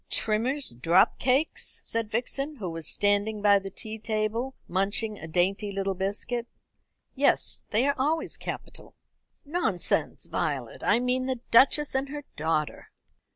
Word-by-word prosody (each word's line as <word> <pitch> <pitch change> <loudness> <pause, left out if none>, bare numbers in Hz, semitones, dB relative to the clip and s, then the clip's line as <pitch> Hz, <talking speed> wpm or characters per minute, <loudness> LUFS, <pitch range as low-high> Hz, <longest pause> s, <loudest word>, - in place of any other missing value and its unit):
"Trimmer's 240 - +1
drop 165 +10 +3
cakes?" 265 +5 +1
said 230 -2 -2
Vixen, 275 +6 -2
who 190 -9 -5
was 165 -2 -4
standing 205 +1 +1
by 205 -1 +5
the 195 0 -7
tea 220 +3 -7
table 220 +4 -2
munching 200 +3 0
a 160 - -7
dainty 190 +5 0
little 195 0 -1
biscuit. 205 +5 -2 0.7
"Yes, - - +2
they 225 +5 +2
are 285 - +3
always 315 +4 0
capital." - - -7 0.5
"Nonsense, 285 - 0
Violet; - - -3
I - - +4
mean 250 +1 +1
the 260 -3 -2
Duchess 280 +5 +5
and 265 +1 -1
her 290 0 -6
daughter." 155 0 -1
220 Hz, 140 wpm, -27 LUFS, 195-260 Hz, 0.7 s, by